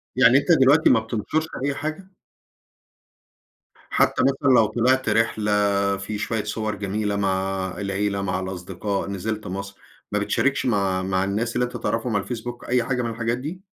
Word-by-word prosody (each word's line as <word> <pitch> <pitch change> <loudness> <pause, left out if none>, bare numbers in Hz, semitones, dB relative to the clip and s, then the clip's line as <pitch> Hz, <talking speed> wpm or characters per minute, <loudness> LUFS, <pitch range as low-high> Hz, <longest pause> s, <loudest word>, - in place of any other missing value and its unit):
يعني 125 +1 +6
أنت 145 +4 +1
دلوقتي 145 0 +5
ما 125 - +5
بتنشرش 115 +8 -2 0.2
أي 140 0 0
حاجة؟ 155 +7 -5 1.8
حتى - - +2
مثلًا 135 0 +3
لو 115 - +6
طلعت 120 +4 +1
رحلة 110 -1 +1 0.5
في 105 +2 -5
شوية 110 0 -2
صور 110 0 -3
جميلة 105 +1 -2
مع 95 -1 -1
العيلة، 100 0 -1
مع 90 -1 -1
الأصدقاء، 95 +2 -4
نزلت 105 +2 -4
مصر، 100 +1 -6 0.3
ما 105 - +1
بتشاركش 125 +6 0
مع 100 -5 +1
مع 95 0 0
الناس 110 +4 -2
اللي 125 - +2
أنت 120 0 -6
تعرفهم 115 0 -2
على 100 - +1
الفيسبوك 120 0 -6
أي 125 0 +2
حاجة 125 +1 -1
من 120 - -2
الحاجات 115 +1 -2
دي؟ 160 +8 -7
110 Hz, 160 wpm, -23 LUFS, 100-125 Hz, 1.8 s, يعني